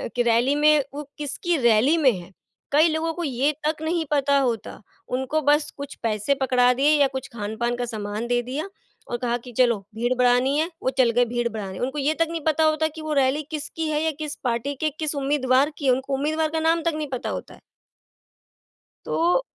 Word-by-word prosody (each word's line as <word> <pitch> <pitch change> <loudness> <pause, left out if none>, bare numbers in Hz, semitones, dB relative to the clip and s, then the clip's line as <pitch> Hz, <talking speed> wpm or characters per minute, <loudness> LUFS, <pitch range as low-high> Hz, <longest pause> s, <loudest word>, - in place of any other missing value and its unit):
कि 245 - +2
रैली 240 +4 +3
में, 300 0 +4
वो 295 +1 -5
किसकी 300 +4 -2
रैली 240 +5 +4
में 285 -5 +5
हैं, 180 +1 -9 0.4
कई 305 +3 +5
लोगों 320 +1 -1
को 345 - -4
ये 275 +1 +1 0.2
तक 310 0 -2
नहीं 325 0 0
पता 280 -1 +3
होता, 240 -5 -2 0.3
उनको 265 +5 -1
बस 295 +1 +2
कुछ 280 0 -7
पैसे 220 +5 +1
पकड़ा 250 -1 +4
दिए 275 +4 +3
या 280 - +6
कुछ 265 - -4
खान-पान 230 +2 -2
का 245 - -2
सामान 215 0 -4
दे 245 0 +1
दिया 280 +9 -4 0.4
और 240 - -2
कहा 240 0 -1
कि 245 - -9
चलो 240 -4 +4 0.2
भीड़ 240 +2 0
बढ़ानी 250 +3 +3
है 320 +2 +1
वो - - +2
चल 255 -3 +5
गए 245 +1 +3
भीड़ 240 0 -1
बढ़ाने। 195 -4 -6
उनको 265 +4 -2
ये 295 +3 +1
तक 330 - +3
नहीं 330 - -3
पता 315 0 +3
होता 310 0 +2
कि 320 - -7
वो 310 -1 -3
रैली 270 +4 0
किसकी 315 +1 -4
है 300 0 0
या 320 - +1
किस 305 -1 -4
पार्टी 245 +3 -1
के 310 - +3
किस 305 -1 -2
उम्मीदवार 275 0 +2
की 285 - -5
है, 260 - +5
उनको 265 +2 -1
उम्मीदवार 310 +3 0
का 320 - 0
नाम 325 +1 +2
तक 335 -1 +1
नहीं 305 -1 -3
पता 250 - -3
होता - - -6
है। - - -17 1.5
तो 350 +8 +2
275 Hz, 215 wpm, -24 LUFS, 245-310 Hz, 1.5 s, या